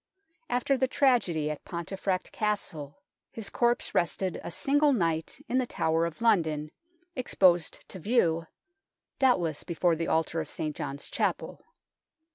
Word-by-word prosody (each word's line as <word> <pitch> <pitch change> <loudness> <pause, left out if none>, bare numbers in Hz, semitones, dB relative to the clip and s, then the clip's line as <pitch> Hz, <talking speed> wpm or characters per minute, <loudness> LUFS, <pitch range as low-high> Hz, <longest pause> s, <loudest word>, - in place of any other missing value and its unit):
After 250 +2 +1
the 260 - +3
tragedy 190 - +2
of 150 - -7
Pontefract 185 +2 -3
Castle, 190 -7 -3 0.3
his 220 -3 -7
corpse 240 0 +1
rested 180 +1 0
a - - -5
single 285 - +2
night 170 - -1
in 255 - +1
the 255 - -1
Tower 165 -3 +1
of 170 +6 -9
London, 160 -9 +2 0.4
exposed 185 - +2
to 190 - -8
view 165 -6 +2 0.7
doubtless 175 - +2
before 170 0 +1
the 165 +1 -2
altar 160 0 +1
of 155 - -7
St. 155 -2 -4
John's 140 +1 -5
Chapel. - - -2
175 Hz, 135 wpm, -29 LUFS, 160-240 Hz, 0.7 s, the